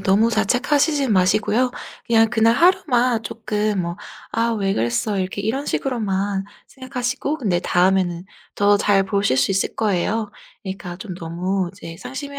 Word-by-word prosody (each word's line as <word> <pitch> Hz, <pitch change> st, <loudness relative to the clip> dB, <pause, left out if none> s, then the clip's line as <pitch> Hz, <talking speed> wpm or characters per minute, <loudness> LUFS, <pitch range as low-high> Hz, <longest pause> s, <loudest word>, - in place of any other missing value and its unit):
너무 195 Hz, +4 st, +3 dB
자책하시진 270 Hz, +4 st, +1 dB
마시고요. 215 Hz, +6 st, +2 dB, 0.3 s
그냥 225 Hz, -1 st, +4 dB
그날 230 Hz, 0 st, +3 dB
하루만 250 Hz, -, +3 dB
쪼끔 210 Hz, -2 st, -2 dB
뭐 170 Hz, 0 st, -4 dB, 0.3 s
'아 230 Hz, +1 st, 0 dB
왜 195 Hz, -3 st, 0 dB
그랬어.' 155 Hz, -, -1 dB
이렇게 190 Hz, +1 st, -3 dB
이런 265 Hz, +7 st, -2 dB
식으로만 200 Hz, -6 st, -1 dB, 0.2 s
생각하시고 255 Hz, +3 st, -3 dB
근데 195 Hz, -, 0 dB
다음에는 180 Hz, -1 st, +1 dB, 0.3 s
더 205 Hz, 0 st, +4 dB
잘 200 Hz, -1 st, +3 dB
보실 200 Hz, -7 st, 0 dB
수 130 Hz, -, +2 dB
있을 195 Hz, 0 st, 0 dB
거예요. 210 Hz, +1 st, 0 dB, 0.3 s
그러니까 190 Hz, -2 st, -6 dB
좀 190 Hz, -1 st, -7 dB
너무 175 Hz, +2 st, -2 dB
이제 165 Hz, -4 st, -10 dB
상심해 280 Hz, +5 st, -7 dB
205 Hz, 330 characters per minute, -21 LUFS, 190-235 Hz, 0.3 s, 그냥